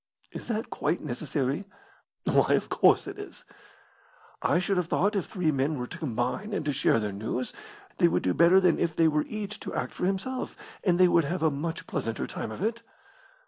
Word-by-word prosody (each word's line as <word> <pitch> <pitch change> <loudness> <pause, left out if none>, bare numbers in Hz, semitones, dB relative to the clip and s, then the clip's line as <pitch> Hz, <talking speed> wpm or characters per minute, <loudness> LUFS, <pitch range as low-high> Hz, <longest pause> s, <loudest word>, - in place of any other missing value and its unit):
"Is - - -7
that 230 +1 -2
quite 175 - -1
necessary?" 140 +5 -2 0.6
"Why, - - +3
of - - -2
course - - +4
it 395 0 -7
is." 410 - -10 1.0
"I - - +3
should 185 +2 0
have 180 -2 0
thought 200 +5 +1
if 195 - -1
three 180 -6 0
men 140 +2 0
were 125 - -3
to - - -8
combine 125 - -2
and 155 - -2
to 145 - 0
share 135 -4 +3
their 105 -2 -2
news, 110 +5 -3 0.5
they - - +6
would 90 +2 +1
do 90 - +2
better 170 +3 +6
than 180 -3 +3
if 165 -2 0
they 165 - +4
were 150 -1 +1
each 210 -1 -5
to - - -6
act - - -2
for 180 - -1
himself, 225 +7 -3 0.3
and 180 -3 +3
they 185 - +7
would 170 -3 +4
have 170 +3 -2
a 160 - +4
much 160 +4 -4
pleasanter 135 - -3
time - - -5
of 135 - -5
it." 230 +2 -1
165 Hz, 210 wpm, -28 LUFS, 135-195 Hz, 1.0 s, they